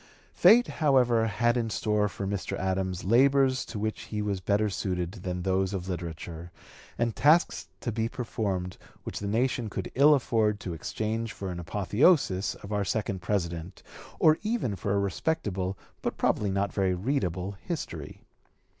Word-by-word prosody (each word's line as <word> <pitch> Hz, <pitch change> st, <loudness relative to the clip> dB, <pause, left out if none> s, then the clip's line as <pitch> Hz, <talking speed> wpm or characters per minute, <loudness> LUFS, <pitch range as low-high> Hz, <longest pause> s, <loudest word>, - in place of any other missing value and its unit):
Fate, 225 Hz, +7 st, +6 dB
however, 125 Hz, -7 st, +3 dB
had 120 Hz, +2 st, +1 dB
in 115 Hz, -2 st, 0 dB
store 105 Hz, -1 st, +1 dB
for 100 Hz, -, -5 dB
Mr. 100 Hz, -1 st, -3 dB
Adams 95 Hz, -1 st, -1 dB
labors 130 Hz, +4 st, +4 dB
to 110 Hz, -, -7 dB
which 110 Hz, +1 st, -3 dB
he 105 Hz, -, -4 dB
was 100 Hz, -3 st, -2 dB
better 105 Hz, +3 st, +2 dB
suited 90 Hz, -3 st, -2 dB
than 90 Hz, -3 st, -5 dB
those 95 Hz, +1 st, +1 dB
of 90 Hz, -1 st, -4 dB
literature, 85 Hz, -1 st, -6 dB, 0.5 s
and 115 Hz, -2 st, 0 dB
tasks 155 Hz, +5 st, +3 dB
to 120 Hz, -, -2 dB
be 115 Hz, +1 st, -1 dB
performed 100 Hz, -8 st, -3 dB, 0.2 s
which -, -, -5 dB
the 100 Hz, -, -4 dB
nation 120 Hz, +1 st, 0 dB
could 95 Hz, -2 st, -5 dB
ill 145 Hz, +3 st, +6 dB
afford 110 Hz, -5 st, +1 dB
to 90 Hz, -, -5 dB
exchange 110 Hz, +7 st, -3 dB
for 95 Hz, -2 st, -5 dB
an 90 Hz, -, -5 dB
apotheosis 100 Hz, -, +2 dB
of 100 Hz, -, -8 dB
our 105 Hz, -1 st, +1 dB
second 100 Hz, -1 st, -2 dB
President, 85 Hz, -2 st, -3 dB, 0.3 s
or 155 Hz, 0 st, +5 dB
even 215 Hz, -, -1 dB
for 100 Hz, +1 st, -1 dB
a -, -, +2 dB
respectable 100 Hz, -, -1 dB, 0.2 s
but -, -, -3 dB
probably 105 Hz, -, +1 dB
not 100 Hz, +1 st, -1 dB
very 95 Hz, -2 st, +1 dB
readable 95 Hz, -, -1 dB
history. 170 Hz, -4 st, -6 dB
105 Hz, 160 wpm, -28 LUFS, 95-120 Hz, 0.5 s, Fate